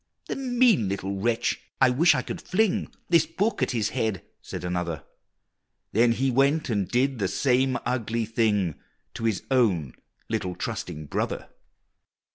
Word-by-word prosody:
"The - - -1
mean 245 - +3
little 100 0 -3
wretch, 115 +2 0 0.2
I 125 - +5
wish 160 +8 +5
I - - -1
could - - -6
fling 210 +1 0 0.2
This 170 -2 +4
book 215 +4 -1
at - - +2
his 110 -4 0
head!" 110 -5 -1 0.2
said - - -7
another; 90 -3 -2 0.9
Then 115 +2 +4
he 130 +2 +1
went 140 +2 +2
and 100 -4 0
did 130 +1 +1
the 95 - +1
same 130 +2 +2
ugly 115 -2 -1
thing 105 - 0 0.3
To 115 - -4
his 110 -4 0
own 95 - +2 0.3
little 90 -1 -2
trusting 75 0 -5
brother! - - -3
115 Hz, 150 wpm, -26 LUFS, 100-135 Hz, 0.9 s, I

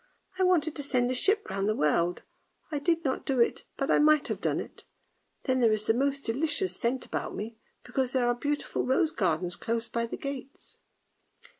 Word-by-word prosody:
I - - +4
wanted 330 -4 +2
to - - -2
send 250 -3 +1
a - - +1
ship 405 - +2
round 195 +1 -1
the 215 - +1
world, 170 +3 +1 0.5
I 295 - -1
did 330 +2 +1
not 260 - 0
do 265 -2 0
it, 235 - +2
but 275 - 0
I - - +5
might 305 0 +4
have - - -3
done - - 0
it; - - -9 0.6
then 260 -2 +1
there 230 -3 +4
is 215 0 0
the 225 - +3
most 275 +3 0
delicious 300 +9 0
scent 250 +1 -1
about - - -4
me, 220 +2 -6 0.2
because 255 +1 -1
there 255 -2 +2
are 240 - +3
beautiful 290 +4 -2
rose 270 +5 +2
gardens 175 - 0
close 230 0 -2
by 235 0 -2
the - - -5
gates! 275 0 -7
260 Hz, 200 wpm, -29 LUFS, 230-290 Hz, 0.6 s, I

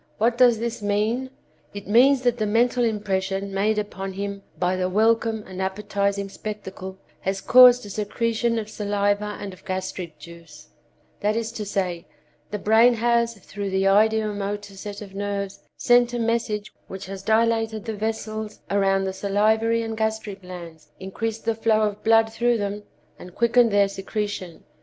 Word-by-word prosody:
What 230 +2 +2
does 245 -2 +5
this 230 0 -4
mean? 215 +5 0 0.5
It 205 - -7
means 255 +5 +5
that 245 -1 +1
the 215 - 0
mental 240 +3 +2
impression 195 -3 -1
made 210 +2 +1
upon 195 -2 -4
him 200 +1 -4 0.2
by 180 0 +1
the 185 0 -1
welcome 220 +2 +2
and 185 0 -7
appetizing 200 +1 -1
spectacle 195 -2 -7 0.2
has 195 +1 -2
caused 250 +1 +7
a - - -8
secretion 230 +3 -1
of 215 -2 -3
saliva 205 0 -1
and 200 -2 -6
of 185 - -16
gastric 185 -3 -5
juice; 155 -1 -14 0.5
that 210 +1 0
is 230 0 -2
to 210 - -5
say, 180 -4 -2 0.4
the 210 - -3
brain 225 +4 +5
has, 235 0 +1
through 200 0 -6
the 190 0 0
ideo 215 +2 +3
motor 205 0 -4
set 205 +1 -7
of 195 -2 -12
nerves, 200 -1 -4 0.2
sent 245 0 +4
a - - -1
message 225 -2 -1
which 190 +1 -7
has 195 0 -7
dilated 225 +1 +1
the 225 - -3
vessels 215 0 -4
around 195 -1 +2
the 190 0 -2
salivary 220 +4 +1
and 225 -1 -5
gastric 220 -2 -2
glands, 170 -4 -10
increased 220 +4 -4
the 230 - +2
flow 220 -1 +2
of 210 -1 -1
blood 225 0 +4
through 240 +1 +2
them 205 0 -3 0.4
and 180 0 -12
quickened 235 0 +4
their 200 -1 +4
secretion. 195 -3 -5
210 Hz, 165 wpm, -24 LUFS, 195-225 Hz, 0.5 s, caused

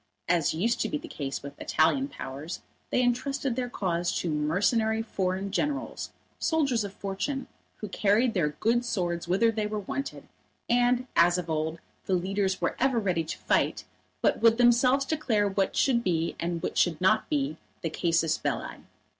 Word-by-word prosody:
As 170 -3 +2
used 230 +9 0
to - - 0
be 305 - -1
the 290 - -9
case 140 -2 -5
with 140 0 -9
Italian 165 - +2
Powers, 145 - -7 0.3
they 250 - +2
entrusted 265 +1 0
their 250 -1 -2
cause 175 -5 -1
to 170 - -1
mercenary 210 +9 +1
foreign 190 -2 -2
generals, 285 +7 -2 0.3
soldiers 275 -9 +1
of 200 - -5
fortune, 200 +8 -3 0.3
who 210 - -6
carried 215 +4 +2
their 170 -6 +1
good 225 +11 +1
swords 175 -8 -2
whither 200 +6 +3
they 215 -1 -1
were 210 0 -3
wanted; 275 +8 -5 0.4
and, 245 +1 +3
as 175 +1 +5
of 170 -2 -3
old, 160 +1 -1 0.3
the 190 - +2
leaders 190 +1 0
were - - -1
ever 265 -1 +2
ready 185 -7 +1
to 155 - -5
fight, - - +1 0.4
but - - +2
would 230 0 +5
themselves 250 +3 +4
declare 250 -10 +1
what 195 -1 0
should 240 -3 +3
be 170 -4 0
and 170 -1 -2
what - - -1
should 165 -4 +2
not 215 +4 +3
be 145 +1 0 0.3
the 165 - 0
casus 165 -1 +1
belli. - - -3
200 Hz, 170 wpm, -28 LUFS, 170-240 Hz, 0.4 s, as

